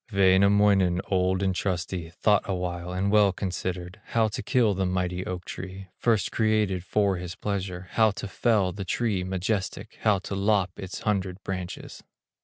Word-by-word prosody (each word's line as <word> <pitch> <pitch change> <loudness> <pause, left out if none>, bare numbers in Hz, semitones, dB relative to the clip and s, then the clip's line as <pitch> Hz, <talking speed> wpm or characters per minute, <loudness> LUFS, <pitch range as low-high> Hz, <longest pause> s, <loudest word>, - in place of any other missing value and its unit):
Wainamoinen, 100 -1 +4
old 95 0 +2
and 95 -1 +1
trusty, 90 -2 -2
Thought 105 +4 +2
awhile, 90 -2 -3
and 95 +2 0
well 105 -2 +5
considered, 90 +1 -4
How 115 -2 +1
to 105 - -4
kill 115 -5 +2
the 95 0 0
mighty 90 0 -1
oak 90 -1 -5
tree, 95 0 -7
First 115 -4 +1
created 110 -5 +1
for 100 0 +1
his 90 -1 -6
pleasure, 95 -3 -4
How 110 -1 +4
to 100 - -5
fell 100 -2 +1
the 100 +2 -5
tree 100 0 0
majestic, 95 +2 -3
How 105 -3 +4
to 95 - -6
lop 100 -1 +2
its 95 -1 -6
hundred 95 -3 -1
branches. 90 -2 -6
95 Hz, 160 wpm, -26 LUFS, 90-105 Hz, -, well